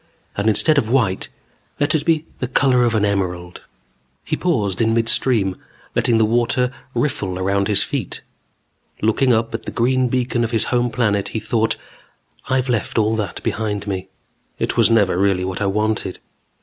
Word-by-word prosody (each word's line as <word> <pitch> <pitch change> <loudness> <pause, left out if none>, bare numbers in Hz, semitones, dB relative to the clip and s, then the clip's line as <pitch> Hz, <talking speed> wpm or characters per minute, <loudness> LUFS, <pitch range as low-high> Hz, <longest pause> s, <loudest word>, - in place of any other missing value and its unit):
And 100 +2 +1
instead 150 +7 +4
of 110 - -2
white, 115 -7 +1 0.5
let 145 +2 +2
it 155 -2 0
be 160 -1 +2
the 125 - -2
color 125 -1 +3
of 115 -1 +1
an 105 -1 +2
emerald. 90 -3 -2 0.6
He - - -1
paused 110 - 0
in 115 0 +2
midstream, 115 -4 +1 0.4
letting 120 -2 +2
the 110 - +4
warm 115 +3 +2
water 125 +2 0 0.2
riffle 95 -10 -1
around 100 +1 0
his 105 - +2
feet. - - -4 0.8
Looking 120 +4 +3
up 115 0 +1
at 115 - -4
the - - -4
green 130 +2 +1
beacon 125 -1 0
of 115 - -1
his 115 -2 +1
home 120 0 +2
planet, 105 -4 0
he 110 - -3
thought: 110 +1 0 0.7
I've 130 0 +1
left 120 -3 -1
all 110 0 +2
that 100 -5 -4
behind 105 -2 -2
me. 95 -2 -4 0.5
It - - -2
was - - +4
never 105 -6 +3
really 95 -2 +2
what 95 +2 -4
I 100 - +1
wanted. 105 -1 -1
110 Hz, 175 wpm, -20 LUFS, 100-125 Hz, 0.8 s, instead